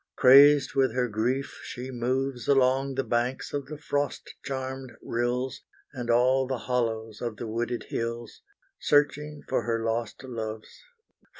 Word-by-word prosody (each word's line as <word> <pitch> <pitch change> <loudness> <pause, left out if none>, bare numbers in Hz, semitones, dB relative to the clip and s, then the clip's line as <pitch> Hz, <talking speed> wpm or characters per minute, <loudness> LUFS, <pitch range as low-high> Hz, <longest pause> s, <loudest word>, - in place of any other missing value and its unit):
Crazed 140 +1 +7
with 135 -2 +2
her 125 -1 +1
grief 120 +5 -2
she 130 +1 -7
moves 125 0 -2
Along 135 0 +3
the 135 - 0
banks 120 +2 -1
of 145 -1 -3
the 150 +1 -7
frost 145 -1 -3
charmed 130 -1 -5
rills, 120 +2 -2 0.3
And 120 -3 -5
all 130 +2 +3
the 130 -1 -2
hollows 115 -3 -2
of 115 -3 -4
the 120 - -5
wooded 115 +2 -2
hills, 115 0 -4 0.4
Searching 150 0 +1
for 130 - +1
her 115 -1 -1
lost 115 +1 -2
loves. 110 - -6
125 Hz, 140 wpm, -27 LUFS, 120-135 Hz, 0.4 s, Crazed